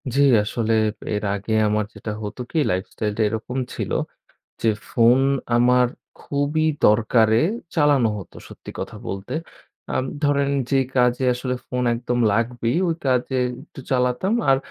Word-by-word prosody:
জী, 140 - +4 0.2
আসলে 115 +1 -1 0.4
এর 105 - -3
আগে 105 +2 -4
আমার 105 0 +1
যেটা 110 - -6
হতো 105 +4 -6
কি? 160 - +1
লাইফস্টাইল 100 +3 -2
টা 115 - +1
এরকম 110 +4 -4 0.2
ছিল - - -4 0.7
যে 115 - +3 0.2
ফোন 120 +2 +4 0.4
আমার 125 +1 +4 0.3
খুবই 145 +2 0 0.2
দরকারে 110 +1 +4 0.3
চালানো 145 -7 +4
হত 95 - -9 0.2
সত্যি - - -11
কথা - - -5
বলতে। 95 +6 -5 0.6
আম 130 - 0 0.2
ধরেন 140 -1 +2 0.2
যেই 135 -1 +2
কাজে 125 0 +2
আসলে 125 +1 -3
ফোন 125 0 -2
একদম 120 +1 -2
লাগবেই, 115 +4 0
ওই 165 - 0
কাজে 130 0 +1 0.3
একটু - - -14
চালাতাম। 125 - +1 0.2
আর 135 - +5
125 Hz, 145 wpm, -22 LUFS, 110-135 Hz, 0.7 s, আর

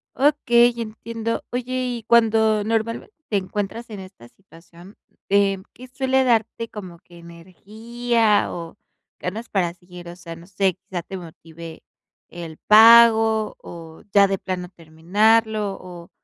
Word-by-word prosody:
Ok, 290 +2 +3 0.4
entiendo. 230 0 -5
Oye 250 +1 -4
y 240 -2 -5
cuando 220 -2 +3
normalmente 230 - -3 0.2
te 205 - +1
encuentras 205 +4 -5
en 205 -3 -8
esta 185 -11 -13
situación, 175 - -18 0.3
em, 195 -1 +2
¿qué 255 +1 -13
suele 265 +1 0
darte 230 -1 0
como 185 -5 -10
que 175 -1 -19
energía 215 +6 -2
o 170 -1 -8 0.4
ganas 220 +6 -6
para 175 -4 -1
seguir? 180 -1 -14
O 175 - -10
sea, 170 -2 -10
no 170 - -14
sé, 190 -1 -1
quizá 190 -2 -7
te 190 +3 -8
motive 165 -1 -12 0.5
el 165 -2 -10
pago 225 0 +6
o 165 -2 -12
ya 200 -1 +6
de 195 0 -2
plano 180 -1 -5
terminarlo 200 +6 0
o 175 -1 -12
200 Hz, 135 wpm, -21 LUFS, 175-225 Hz, 0.5 s, pago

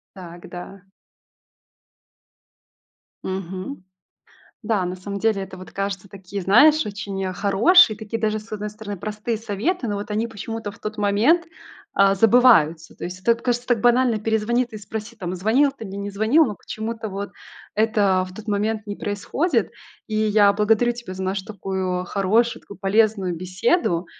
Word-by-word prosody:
Так, 175 -2 -10
да. 180 +2 -9 2.4
Мгм. 190 +5 -5 0.8
Да, 210 -4 0
на 180 +1 -4
самом 200 +2 -6
деле 215 -2 +1
это 190 0 -8
вот, 185 0 -11
кажется, 195 0 -4
такие, 195 +1 -7
знаешь, 295 - +6
очень 200 -2 -4
хорошие, 215 - +5
такие 220 +1 -5
даже, 215 -1 0
с 215 - -17
одной 210 0 -4
стороны, 210 -1 -7
простые 215 +4 -3
советы, 230 - -2
но 205 - -2
вот 205 +1 -5
они 215 +2 0
почему-то 225 -1 -6
в 225 - -17
тот 215 0 -6
момент, 210 +12 +3 0.5
а, 195 0 +5
забываются. 200 -8 +4
То - - -7
есть 180 +1 -6
это 235 +5 +4
вот 230 - -5
кажется 245 0 -1
так 240 -3 +2
банально, 245 -1 +3
перезвони 220 +3 +1
ты 240 -2 -16
и - - -6
спроси, 215 +2 -7
там 185 -5 -5
звонил 230 +10 +3
ты 270 -4 -10
мне, 195 -1 -7
не 200 0 -4
звонил, 220 +11 +4
но 210 - -4
почему-то 220 0 -5
вот 200 +1 -5 0.5
это 205 -4 +2
в 185 - -13
тот 220 +2 -10
момент 215 +1 -1
не 205 -1 -5
происходит. 230 - -1 0.4
И 215 - -2
я 210 -1 +4
благодарю 220 +3 +2
тебя 235 -6 -8
за 190 - -5
нашу 190 +1 -2
такую 190 -3 -3
хорошую, 210 +6 +1
такую 200 - -12
полезную 195 -3 +2
беседу. 185 - 0
210 Hz, 165 wpm, -22 LUFS, 195-225 Hz, 2.4 s, знаешь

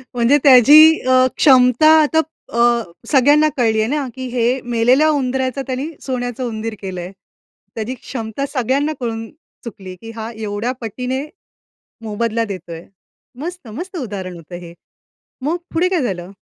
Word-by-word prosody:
म्हणजे 245 +4 +3
त्याची 295 +5 +8
अ, 260 - +4 0.2
क्षमता 255 +1 +5
आता 310 +1 +2 0.3
अ, 235 - -1 0.5
सगळ्यांना 290 +3 +4
कळली 225 -3 +2
आहे 220 - 0
ना, 290 -1 -1
की 260 0 -6
हे 245 +2 +1
मेलेल्या 245 +6 +2
उंदराचं 265 -1 -1
त्यांनी 260 +3 -3
सोन्याचं 245 -1 -4
उंदीर 225 -1 -5
केलंय. 185 -1 -6 0.6
त्याची 225 +3 -4
क्षमता 235 +1 -5
सगळ्यांना 275 +4 0
कळून 225 -2 -4 0.3
चुकली, 195 -6 -9
की 225 0 -9
हा 225 +1 -6
एवढ्या 215 +2 -3
पटीने 250 +5 -4 0.8
मोबदला 230 +1 -1
देतोय. 180 -5 -8 0.6
मस्त 345 -5 -7
मस्त 350 - -7
उदाहरण 195 - -6
होतं 170 +1 -12
हे. 170 0 -11 0.7
मग 320 +5 0 0.2
पुढे 350 +3 +2
काय 365 -5 0
झालं? 185 -6 -4
245 Hz, 140 wpm, -18 LUFS, 220-275 Hz, 0.8 s, त्याची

